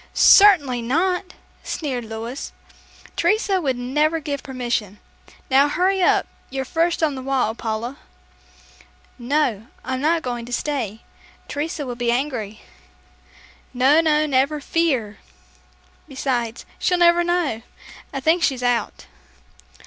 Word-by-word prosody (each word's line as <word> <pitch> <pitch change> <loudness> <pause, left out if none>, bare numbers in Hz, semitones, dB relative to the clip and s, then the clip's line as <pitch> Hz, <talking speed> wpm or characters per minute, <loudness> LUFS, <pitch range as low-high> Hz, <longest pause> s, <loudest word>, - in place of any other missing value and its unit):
"Certainly 300 -12 +6
not," 360 +9 -1 0.3
sneered 260 -7 -4
Louis. 225 +4 -6 0.6
"Teresa 410 -3 +1
would 265 -5 -1
never 300 +6 0
give 290 -3 -4
permission. 240 -6 -3 0.5
Now, 275 +2 +5
hurry 375 +5 +1
up, 355 - +3 0.2
you're 265 0 -3
first 330 +3 0
on 305 -2 +2
the 260 - -6
wall, 260 -4 0
Paula." 230 +3 -4 1.2
"No, 240 -4 0 0.2
I'm 260 0 -3
not 320 +2 +1
going 240 -2 -4
to - - -10
stay. 240 -5 -3 0.5
Teresa 295 0 -4
will 250 - -4
be 240 0 -1
angry." 240 -5 -3 1.1
"No, 270 +6 +5
no, 305 -1 +2
never 280 +1 +1
fear. 270 -10 -1 0.9
Besides, 245 -4 -3
she'll 360 - +1
never 345 0 +5
know. 345 -10 0 0.5
I - - -4
think 325 +5 +3
she's 265 -6 0
out." 245 -3 -1
270 Hz, 120 wpm, -22 LUFS, 240-320 Hz, 1.2 s, Certainly